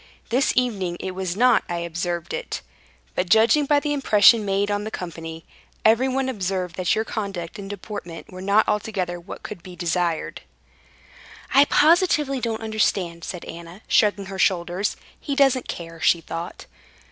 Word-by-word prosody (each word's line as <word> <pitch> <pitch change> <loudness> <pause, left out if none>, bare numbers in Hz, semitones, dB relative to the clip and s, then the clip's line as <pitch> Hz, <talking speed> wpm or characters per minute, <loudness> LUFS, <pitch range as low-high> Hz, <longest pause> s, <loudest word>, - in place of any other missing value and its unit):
This 255 +4 +2
evening 200 -9 0
it 190 - -4
was 185 0 -4
not 245 0 +5
I 175 - -2
observed 170 0 -3
it, - - -4 0.5
but 180 -1 -1
judging 230 - +5
by 290 0 +4
the 290 0 -1
impression 225 -5 +5
made 200 +1 0
on 205 0 -1
the 215 - -4
company, 165 -4 -7 0.4
everyone 260 +4 +3
observed 185 -6 -2
that 185 -2 +1
your 220 - 0
conduct 195 -6 -5
and 195 -1 -7
deportment 200 -4 -7
were 185 - -8
not 200 +3 +3
altogether 195 -4 -1
what 170 - -10
could 205 -5 -7
be 180 0 -11
desired." 170 -1 -1 1.1
"I 275 +1 +7
positively 300 -4 +3
don't 225 -1 -2
understand," 195 -6 0
said 180 - -6
Anna, 170 +4 -10
shrugging 205 -2 +3
her 190 0 -7
shoulders—"He 185 - -1
doesn't 270 -2 +3
care," 165 -1 -7
she 170 - +4
thought. 165 +1 -7
195 Hz, 155 wpm, -23 LUFS, 175-225 Hz, 1.1 s, I